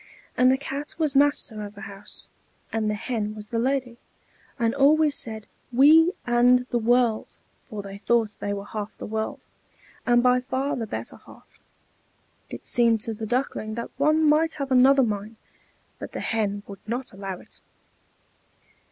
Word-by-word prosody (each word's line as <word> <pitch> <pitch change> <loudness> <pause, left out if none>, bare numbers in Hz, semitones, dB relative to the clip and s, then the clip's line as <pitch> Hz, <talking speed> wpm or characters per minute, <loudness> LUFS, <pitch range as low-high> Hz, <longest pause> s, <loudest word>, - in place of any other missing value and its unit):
And 255 0 +5
the 265 - +3
Cat 280 +1 -6
was 305 -4 0
master 275 -6 +2
of 205 0 -8
the 205 - -11
house, 200 -2 -9 0.5
and 220 -1 0
the 210 - 0
Hen 215 -1 -3
was 210 -1 -8
the 230 -2 -1
lady, 250 -1 -1 0.6
and 230 -2 +1
always 295 +2 +4
said 220 -5 -2 0.3
"We 315 +7 +6
and 245 +1 +4
the 240 - +1
world!" 235 -1 +2 0.4
for 210 -4 -6
they 200 0 -9
thought 225 -1 +1
they 205 - -3
were 200 0 -4
half 210 0 -6
the - - -7
world, 220 0 -3 0.6
and 240 0 +3
by 250 0 +4
far 265 +2 -2
the 225 -2 -4
better - - -6
half. - - -18 0.9
It - - -9
seemed 235 -2 +3
to 225 - -3
the 220 0 -6
Duckling 230 -3 -2
that 235 - -5
one 305 +3 +3
might 315 +2 +3
have 275 -3 -5
another 265 +2 +6
mind, 215 -1 -3 0.6
but - - -8
the - - -4
Hen 205 -2 -1
would 200 -1 -10
not 245 +2 -4
allow 195 -1 -5
it. - - -15
235 Hz, 170 wpm, -25 LUFS, 215-270 Hz, 0.9 s, We